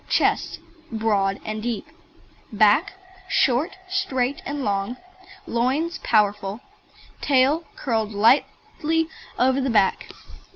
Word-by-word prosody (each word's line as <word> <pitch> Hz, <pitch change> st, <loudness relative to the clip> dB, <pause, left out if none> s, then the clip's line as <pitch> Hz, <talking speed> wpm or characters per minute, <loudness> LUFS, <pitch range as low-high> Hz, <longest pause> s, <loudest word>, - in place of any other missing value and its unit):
CHEST -, -, +1 dB, 0.3 s
Broad 205 Hz, -3 st, 0 dB
and 215 Hz, 0 st, -4 dB
deep. 230 Hz, -2 st, -3 dB, 0.7 s
BACK 215 Hz, -, +3 dB, 0.4 s
Short, 270 Hz, +8 st, +2 dB
straight, 270 Hz, -8 st, -1 dB
and 285 Hz, 0 st, -3 dB
strong. 205 Hz, +1 st, -1 dB, 0.5 s
LOINS 270 Hz, +9 st, -1 dB
Powerful. 205 Hz, -1 st, +1 dB, 0.6 s
TAIL 285 Hz, +4 st, +3 dB
Curled 220 Hz, -4 st, -1 dB
tightly 295 Hz, +8 st, +1 dB, 0.3 s
over 260 Hz, +2 st, +2 dB
the 265 Hz, -, -1 dB
back. 210 Hz, -5 st, +2 dB
240 Hz, 95 wpm, -23 LUFS, 210-280 Hz, 0.7 s, BACK